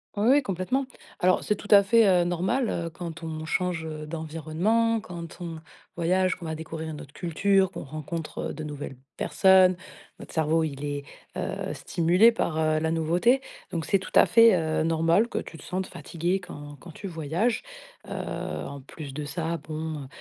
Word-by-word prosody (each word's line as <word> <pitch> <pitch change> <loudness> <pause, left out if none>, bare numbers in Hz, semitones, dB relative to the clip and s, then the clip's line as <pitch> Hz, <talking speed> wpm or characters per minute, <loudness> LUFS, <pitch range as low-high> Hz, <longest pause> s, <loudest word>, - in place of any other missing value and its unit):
Oui, 210 +3 +1
oui 285 +2 +6
complètement. 200 +6 -1 0.3
Alors 185 +1 +3
c'est 210 - +1
tout 205 - -11
à 200 -1 +8
fait, 225 +1 +5
heu, 180 -2 +5
normal, 185 +8 0
heu, 170 -1 -2
quand 165 0 -7
on 160 -1 -5
change, 175 -1 -1
heu, 155 -1 -6
d'environnement, 165 +9 0
quand 170 -5 -8
on 165 -2 -5 0.4
voyage, 185 +2 +2
qu'on 175 - -10
va 160 0 -3
découvrir 160 0 -6
une 155 -2 -6
autre 140 - -13
culture, 190 +3 +2
qu'on - - -6
rencontre, 155 +3 -5
heu, - - -4
de 155 - -6
nouvelles 145 -2 -6 0.2
personnes. 190 -1 +5 0.4
Notre - - -11
cerveau 160 0 +2
il 140 -2 -4
est, 145 0 -3 0.3
heu, - - -3
stimulé 180 +8 +4
par, 170 -8 -1
heu, 155 -1 +2
la 160 +1 0
nouveauté. 175 +11 +2 0.3
Donc 165 -2 -2
c'est 195 - +2
tout 185 - -9
à - - +8
fait, 230 -4 +7
heu, 160 -2 0
normal 165 +6 +3
que - - -5
tu - - -8
te 150 - -13
sentes 185 +1 -3
fatigué 175 +3 -2
quand 145 -5 -10
quand 170 +5 -11
tu 200 - -10
voyages. 170 +7 -1 0.5
Heu, - - -10
en 140 -1 -5
plus 140 0 -9
de 150 - -4
ça 165 +1 -2
bon, 155 -3 -5
165 Hz, 185 wpm, -27 LUFS, 155-190 Hz, 0.5 s, à